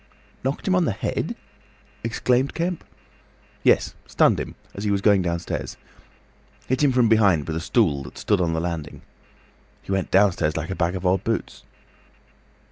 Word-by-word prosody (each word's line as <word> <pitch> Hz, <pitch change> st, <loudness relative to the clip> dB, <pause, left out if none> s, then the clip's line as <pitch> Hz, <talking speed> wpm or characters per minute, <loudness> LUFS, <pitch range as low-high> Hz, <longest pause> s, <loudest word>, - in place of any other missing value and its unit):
"Knocked 135 Hz, +8 st, -2 dB
him 190 Hz, -, +3 dB
on 180 Hz, -2 st, +3 dB
the 115 Hz, -, 0 dB
head?" -, -, -3 dB, 0.7 s
exclaimed 125 Hz, +3 st, +1 dB
Kemp. 170 Hz, 0 st, -2 dB, 0.8 s
"Yes—stunned -, -, +2 dB
him—as 100 Hz, -, -8 dB
he 105 Hz, -, 0 dB
was 100 Hz, -1 st, +2 dB
going 100 Hz, -1 st, +4 dB
downstairs. 85 Hz, -1 st, -3 dB, 0.9 s
Hit 130 Hz, +2 st, 0 dB
him 140 Hz, -, +5 dB
from 125 Hz, -2 st, +3 dB
behind 100 Hz, -9 st, +3 dB
with 80 Hz, -, -3 dB
a -, -, -1 dB
stool 85 Hz, -, +1 dB
that 70 Hz, -, -10 dB
stood 105 Hz, -3 st, +1 dB
on 85 Hz, -2 st, +1 dB
the 80 Hz, -, 0 dB
landing. 85 Hz, -3 st, -5 dB, 0.8 s
He -, -, -7 dB
went 95 Hz, -1 st, 0 dB
downstairs 95 Hz, -6 st, +3 dB
like 80 Hz, +3 st, -3 dB
a -, -, -2 dB
bag 85 Hz, +1 st, 0 dB
of 95 Hz, 0 st, -5 dB
old 95 Hz, +1 st, +2 dB
boots." 115 Hz, 0 st, -3 dB
95 Hz, 160 wpm, -23 LUFS, 85-115 Hz, 0.9 s, him